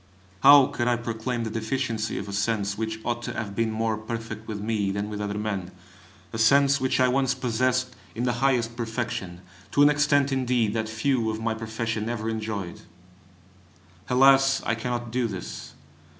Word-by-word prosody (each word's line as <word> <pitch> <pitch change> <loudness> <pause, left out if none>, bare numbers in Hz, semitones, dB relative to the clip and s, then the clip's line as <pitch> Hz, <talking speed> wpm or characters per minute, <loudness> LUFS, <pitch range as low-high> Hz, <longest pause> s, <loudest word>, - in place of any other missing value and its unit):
how 140 0 +9
could 130 -3 -2
I 120 - +3
proclaim 120 +1 -3
the 110 - -4
deficiency 115 -1 -2
of 100 - -5
a 100 - -6
sense 100 0 0
which 110 +1 -3
ought 120 0 -1
to - - -5
have 105 -3 -5
been 115 +1 +1
more 110 0 -1
perfect 110 0 -6
with 105 -2 -4
me 105 -1 -1
than 100 +2 -3
with 105 0 -4
other 105 0 -3
men, 100 -4 -3 0.6
a 115 - -4
sense 140 +5 +4
which 130 0 +1
I 130 - +5
once 135 +1 +1
possessed 130 +1 0 0.2
in 120 - -2
the 125 -1 +1
highest 120 -4 +1
perfection, 115 -7 -4 0.3
to 145 - +4
an 145 - +7
extent, 145 -1 +2
indeed, 125 -5 +1
that 110 -1 -2
few 115 +1 0
of 110 0 -3
my 110 0 -1
profession 110 0 -3
ever 115 -2 -3
enjoyed! 105 -5 -4 1.3
Alas, 135 +1 +5
I - - +1
cannot 120 0 -3
do 125 -1 0
this! 95 -4 -7
115 Hz, 180 wpm, -25 LUFS, 110-125 Hz, 1.3 s, how